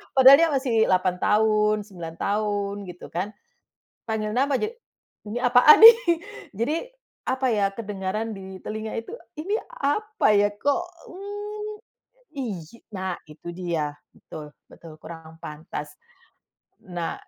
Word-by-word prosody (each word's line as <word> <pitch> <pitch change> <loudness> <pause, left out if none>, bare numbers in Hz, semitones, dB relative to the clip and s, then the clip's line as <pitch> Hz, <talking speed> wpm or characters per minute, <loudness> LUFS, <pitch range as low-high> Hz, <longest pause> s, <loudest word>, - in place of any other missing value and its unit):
Padahal 270 +2 +9
dia 335 - +5
masih 270 -5 -1
8 185 -1 +2
tahun 215 0 +3
9 175 -5 -9
tahun 205 +1 -1
gitu 180 0 -10
kan, 190 +5 -4 0.7
panggil 215 -1 -2
nama 270 +3 +2
ja - - -1 0.6
ini 225 - -4
apaan 245 +4 +7
nih? 455 +1 +11 0.6
Jadi 235 +8 0 0.5
apa 260 +1 0
ya 200 -2 +2
kedengaran 210 +1 -4
di 190 -1 -9
telinga 220 +3 -5
itu 225 - -6 0.2
Ini 380 +7 -2
apa 430 - -1
ya 205 0 +4
kok, 285 +9 +1 0.2
mmm, 415 +2 -7 0.6
iy 210 -10 -3 0.3
nah 185 -2 -3
itu 155 +2 -10
dia, 170 -4 -2 0.2
betul 150 -2 -11 0.2
betul 165 -2 -13
kurang 160 -1 -10
pantas. 150 -1 -7 0.8
Nah 175 -2 -5
210 Hz, 125 wpm, -24 LUFS, 180-265 Hz, 0.8 s, nih